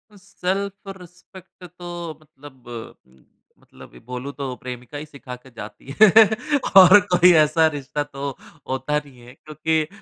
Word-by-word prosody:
Self 200 Hz, 0 st, -5 dB
respect 180 Hz, +1 st, -17 dB
तो 175 Hz, -2 st, -8 dB
मतलब 130 Hz, -6 st, -12 dB, 0.6 s
मतलब 65 Hz, 0 st, -17 dB
बोलूँ 125 Hz, +3 st, -6 dB
तो 135 Hz, -3 st, -5 dB
प्रेमिका 125 Hz, +3 st, -9 dB
ही 150 Hz, -, -7 dB
सिखा 140 Hz, -4 st, -10 dB
के 125 Hz, +1 st, -18 dB
जाती 115 Hz, +4 st, -10 dB
है। 215 Hz, -, +10 dB, 0.7 s
और 190 Hz, +1 st, +9 dB
कोई 180 Hz, 0 st, +6 dB
ऐसा 155 Hz, +1 st, +4 dB
रिश्ता 145 Hz, -1 st, -4 dB
तो 140 Hz, -1 st, -6 dB, 0.4 s
होता 135 Hz, +3 st, -1 dB
नहीं 135 Hz, -3 st, -18 dB
है 120 Hz, +1 st, -15 dB
क्योंकि 155 Hz, +2 st, -2 dB
150 Hz, 130 wpm, -21 LUFS, 130-175 Hz, 0.7 s, है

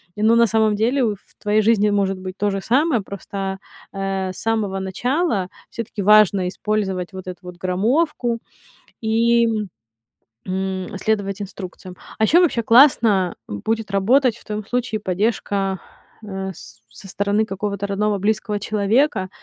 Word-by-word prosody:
Не, 210 Hz, -, -3 dB
ну, 225 Hz, +1 st, +5 dB
на 235 Hz, 0 st, +5 dB
самом 220 Hz, 0 st, +2 dB
деле 245 Hz, +6 st, +1 dB
в 210 Hz, -3 st, -1 dB, 0.2 s
твоей 210 Hz, +1 st, +2 dB
жизни 210 Hz, -1 st, +3 dB
может 195 Hz, -1 st, +1 dB
быть 185 Hz, 0 st, -7 dB
то 205 Hz, 0 st, +1 dB
же 195 Hz, -, -2 dB
самое, 260 Hz, -, +2 dB
просто, 195 Hz, 0 st, -5 dB, 0.3 s
а, 195 Hz, -1 st, -2 dB
э, -, -, -5 dB
с -, -, -13 dB
самого 215 Hz, -4 st, -1 dB
начала 205 Hz, -, -1 dB, 0.2 s
всё-таки 225 Hz, -2 st, -5 dB
важно 200 Hz, -2 st, +5 dB
использовать 190 Hz, -2 st, -2 dB
вот 185 Hz, -1 st, -8 dB
эту 180 Hz, -1 st, -6 dB
вот 180 Hz, -1 st, -9 dB
граммовку 230 Hz, -, 0 dB, 0.6 s
и, 230 Hz, +1 st, +3 dB, 1.0 s
м, 190 Hz, 0 st, -3 dB
следовать 200 Hz, -1 st, -1 dB
инструкциям. 185 Hz, -2 st, -8 dB, 0.2 s
А -, -, +2 dB
еще 335 Hz, +10 st, +5 dB
вообще 280 Hz, -9 st, +2 dB
классно 225 Hz, -, +5 dB
будет 215 Hz, -, -3 dB
работать 235 Hz, +5 st, +3 dB
в -, -, -18 dB
твоём 210 Hz, -1 st, -4 dB
случае 245 Hz, -3 st, -1 dB
поддержка, 195 Hz, -1 st, -1 dB, 0.4 s
э, 190 Hz, -2 st, -5 dB
с 115 Hz, -6 st, -13 dB
со 195 Hz, -, -10 dB
стороны 205 Hz, +2 st, 0 dB
какого-то 200 Hz, 0 st, -3 dB
родного 205 Hz, +1 st, 0 dB
близкого 210 Hz, +1 st, 0 dB
человека, 210 Hz, +1 st, +1 dB
205 Hz, 150 wpm, -21 LUFS, 190-225 Hz, 1.0 s, ну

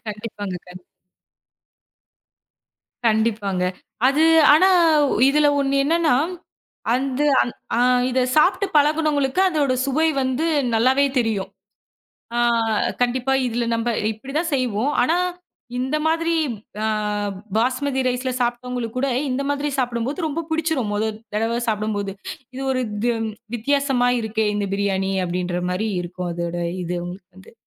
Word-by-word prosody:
கண்டிப்பாங்க 205 Hz, -3 st, -5 dB
கண் 180 Hz, 0 st, -12 dB, 2.2 s
கண்டிப்பாங்க. 215 Hz, -4 st, +1 dB, 0.4 s
அது 285 Hz, +3 st, +2 dB, 0.3 s
ஆனா, 370 Hz, +5 st, +5 dB, 0.6 s
இதில 295 Hz, +1 st, +3 dB
ஒண்ணு 275 Hz, 0 st, +1 dB
என்னான்னா, 325 Hz, -2 st, +2 dB, 0.8 s
அந்து 270 Hz, +2 st, -1 dB, 0.2 s
அந் 240 Hz, -, -2 dB, 0.2 s
அ -, -, +2 dB, 0.3 s
இத 255 Hz, +1 st, +2 dB, 0.2 s
சாப்ட்டு 380 Hz, +5 st, +4 dB
பழகுனவங்களுக்கு 300 Hz, +1 st, +2 dB
அதோட 290 Hz, -6 st, +1 dB
சுவை 310 Hz, +4 st, +2 dB
வந்து 260 Hz, +5 st, 0 dB, 0.3 s
நல்லாவே 260 Hz, +5 st, +3 dB
தெரியும். 205 Hz, -5 st, -1 dB, 0.9 s
ஆ -, -, +1 dB, 0.6 s
கண்டிப்பா. 250 Hz, +2 st, 0 dB
இதில 235 Hz, 0 st, -1 dB
நம்ப 230 Hz, +1 st, -1 dB, 0.2 s
இப்படி 265 Hz, +6 st, -10 dB
தான் 335 Hz, -2 st, -2 dB
செய்வோம். 255 Hz, +1 st, 0 dB
ஆனா, 325 Hz, +7 st, +2 dB, 0.6 s
இந்த 265 Hz, +4 st, -1 dB
மாதிரி, 330 Hz, +1 st, +1 dB, 0.5 s
அ -, -, +2 dB, 0.7 s
பாஸ்மதி 260 Hz, +3 st, 0 dB
ரைஸ்ல 255 Hz, +1 st, -1 dB
சாப்ட்டவங்களுக்கு 245 Hz, -1 st, -2 dB
கூட, 275 Hz, -, +1 dB, 0.2 s
இந்த 255 Hz, +2 st, -1 dB
மாதிரி 285 Hz, +1 st, -1 dB
சாப்பிடும் 240 Hz, -2 st, -1 dB
போது 315 Hz, +4 st, -2 dB
ரொம்ப 320 Hz, +2 st, -3 dB
பிடிச்சிரும். 315 Hz, -9 st, 0 dB
மொதல் 215 Hz, +1 st, -2 dB, 0.2 s
தடவை 225 Hz, +2 st, 0 dB
சாப்பிடும்போது, 210 Hz, -2 st, -1 dB, 0.4 s
"இது 270 Hz, -, -4 dB
ஒரு 255 Hz, -1 st, 0 dB
க்கும் 225 Hz, +1 st, -1 dB, 0.3 s
வித்தியாசமா 270 Hz, 0 st, +1 dB
இருக்கே! 220 Hz, 0 st, -1 dB
இந்த 205 Hz, -1 st, -1 dB
பிரியாணி!" 195 Hz, -1 st, 0 dB
அப்டின்ற 180 Hz, 0 st, -2 dB
மாரி 215 Hz, +4 st, -1 dB
இருக்கும். 175 Hz, 0 st, -5 dB
அதோட 170 Hz, 0 st, -3 dB, 0.3 s
இது 175 Hz, +1 st, -3 dB
அவுங்களுக்கு 180 Hz, +2 st, -8 dB
வந்து. 190 Hz, -, -16 dB
245 Hz, 125 wpm, -22 LUFS, 210-280 Hz, 2.2 s, ஆனா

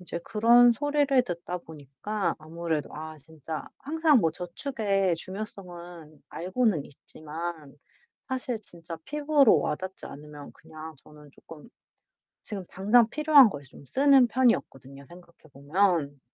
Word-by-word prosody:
이제 180 Hz, -, -6 dB
그런 235 Hz, +3 st, +5 dB
소리를 285 Hz, 0 st, +2 dB
듣다 180 Hz, -4 st, -5 dB
보니까 160 Hz, +6 st, -4 dB
아무래도 160 Hz, -1 st, -4 dB
아 155 Hz, +1 st, -8 dB
진짜 160 Hz, +1 st, -8 dB
항상 310 Hz, -1 st, +2 dB
뭐 165 Hz, -4 st, +2 dB
저축의 195 Hz, -, -1 dB
중요성은 175 Hz, -5 st, -9 dB
알고는 185 Hz, -, -1 dB
있지만 155 Hz, 0 st, -8 dB, 0.5 s
사실 255 Hz, -2 st, -3 dB
진짜 170 Hz, -4 st, -10 dB
피부로 295 Hz, -3 st, +3 dB
와닿지 185 Hz, +5 st, -4 dB
않으면 145 Hz, 0 st, -11 dB
그냥 155 Hz, 0 st, -11 dB
저는 150 Hz, -1 st, -16 dB
쪼끔 160 Hz, +7 st, -15 dB, 0.7 s
지금 200 Hz, -3 st, -6 dB
당장 220 Hz, +4 st, +3 dB
필요한 300 Hz, -2 st, +6 dB
거에 145 Hz, -8 st, -7 dB
좀 140 Hz, 0 st, -16 dB
쓰는 270 Hz, -, +5 dB
편이었거든요, 140 Hz, -, -1 dB
생각해 175 Hz, -1 st, -16 dB, 0.2 s
보면. 145 Hz, 0 st, 0 dB
175 Hz, 285 characters per minute, -27 LUFS, 155-235 Hz, 0.7 s, 필요한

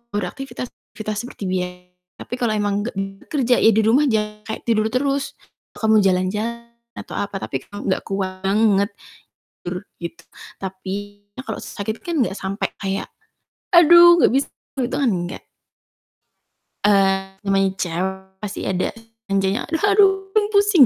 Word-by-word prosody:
beraktivitas, 255 Hz, +4 st, -4 dB, 0.3 s
aktivitas 215 Hz, -1 st, -4 dB
seperti 245 Hz, -, -9 dB
bia 180 Hz, -1 st, 0 dB, 0.5 s
tapi 245 Hz, -, -7 dB
kalo 230 Hz, -3 st, +1 dB
emang 205 Hz, -1 st, 0 dB
gak 240 Hz, -, -6 dB, 0.3 s
kerja 255 Hz, -4 st, +2 dB
ya, 225 Hz, -, +6 dB
di 220 Hz, -, +4 dB
rumah 260 Hz, +7 st, +4 dB
jangan 210 Hz, -2 st, 0 dB
kayak 220 Hz, -, -5 dB
tidur 220 Hz, -2 st, +2 dB
terus, 275 Hz, +3 st, -1 dB, 0.4 s
kamu 220 Hz, -1 st, +4 dB
jalan-jalan 210 Hz, +5 st, 0 dB, 0.2 s
atau -, -, -9 dB
apa, 200 Hz, 0 st, -3 dB
tapi 135 Hz, -, -3 dB
gak 205 Hz, -2 st, -3 dB
kuat 190 Hz, -1 st, -3 dB
banget, 200 Hz, +1 st, +3 dB, 0.8 s
tur 180 Hz, +2 st, -3 dB, 0.2 s
gitu. 170 Hz, -1 st, -7 dB, 0.4 s
Tapi 200 Hz, +2 st, -6 dB, 0.2 s
kalo 220 Hz, -5 st, -5 dB
sakit 215 Hz, +2 st, -5 dB
kan 335 Hz, -5 st, 0 dB
gak 205 Hz, -4 st, -1 dB
sampe 195 Hz, +2 st, -2 dB
kayak, 195 Hz, -1 st, -3 dB, 0.6 s
"Aduh 345 Hz, 0 st, +8 dB
gak -, -, +6 dB
bisa," 270 Hz, +3 st, +1 dB, 0.4 s
itu 240 Hz, -, -6 dB
kan 255 Hz, -, +3 dB
enggak. 175 Hz, -2 st, -3 dB, 1.4 s
Eee, 195 Hz, -1 st, +2 dB
namanya 195 Hz, 0 st, +3 dB
cewek 190 Hz, +2 st, -3 dB
pasti 205 Hz, 0 st, -4 dB
ada 185 Hz, -1 st, 0 dB, 0.4 s
manjanya. 195 Hz, +3 st, +1 dB
"Aduh, 390 Hz, +2 st, +3 dB
aduh, 420 Hz, -1 st, +4 dB
pusing." 405 Hz, -8 st, +6 dB
210 Hz, 140 wpm, -21 LUFS, 195-255 Hz, 1.4 s, Aduh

